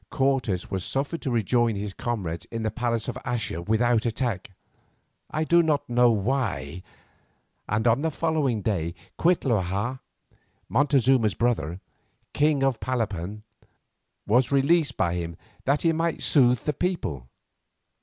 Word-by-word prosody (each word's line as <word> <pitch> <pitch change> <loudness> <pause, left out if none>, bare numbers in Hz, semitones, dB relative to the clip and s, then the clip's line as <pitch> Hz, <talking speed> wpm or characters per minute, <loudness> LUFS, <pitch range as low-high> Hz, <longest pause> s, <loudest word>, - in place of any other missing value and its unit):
Cortes 130 -10 0
was 95 -2 -2
suffered 140 - -2
to 140 - -2
rejoin 120 0 +2
his 100 0 -4
comrades 95 -9 -3
in 115 -1 -5
the 110 - -1
palace 120 -2 -2
of - - -3
Axa 110 -8 -3
without 115 +1 +2
attack, 115 -5 -2 0.8
I 155 - -1
do 170 +2 +5
not 155 -3 0
know 120 0 +4
why, 100 - -1 0.9
and 110 +3 +1
on 120 +4 +3
the 160 - +1
following 150 -9 0
day 85 -5 -1 0.2
Cuitlahua, 120 - +1 0.7
Montezuma's 130 -6 +3
brother, 95 -8 -1 0.5
king 145 -2 +2
of 135 -4 +1
Palapan, 105 -5 -3 0.8
was 120 +6 +3
released 140 0 +2
by 85 -2 +1
him 85 -1 -4 0.3
that 140 +2 +1
he 165 -1 +3
might 165 0 -1
soothe 125 -4 +4
the 150 - -1
people. 110 - -2
120 Hz, 135 wpm, -26 LUFS, 100-135 Hz, 0.9 s, do